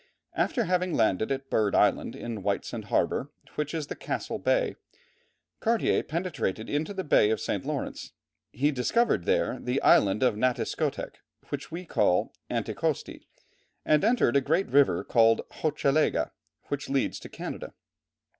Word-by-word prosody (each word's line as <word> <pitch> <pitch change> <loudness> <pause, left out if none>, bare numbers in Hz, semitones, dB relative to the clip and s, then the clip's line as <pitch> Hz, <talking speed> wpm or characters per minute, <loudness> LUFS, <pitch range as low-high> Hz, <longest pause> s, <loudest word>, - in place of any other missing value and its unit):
After 240 - +1
having 180 -2 0
landed 110 +1 +1
at 135 0 -3
Bird 105 -3 +2
Island, - - +2
in 115 -3 -5
Whitesand 100 +1 -2
harbour, 140 - 0 0.2
which 150 0 -2
is 155 -2 -2
in - - -7
Castle - - -4
Bay, - - +1 0.8
Cartier 230 -1 +2
penetrated 155 - -3
into 150 +5 -1
the 195 -2 -3
Bay 105 -9 +4
of 110 - +1
St. - - -2
Lawrence. - - -4 0.4
He 145 +5 +1
discovered 135 - +1
there - - +1
the 125 +2 -1
Island 100 +4 +4
of 125 -4 +3
Natiscotec 125 +3 -1 0.3
which 140 -1 -5
we 175 +3 -6
call 100 - +1 0.2
Anticosti, - - -2 0.6
and 150 -1 +3
entered 225 - +3
a 140 - +5
great 165 +8 +1
river 140 0 +4
called 115 -1 +4
Hochelaga, 150 -1 +1 0.4
which 145 -1 -3
leads 135 -1 0
to - - -10
Canada. - - -7
140 Hz, 145 wpm, -28 LUFS, 115-165 Hz, 0.8 s, a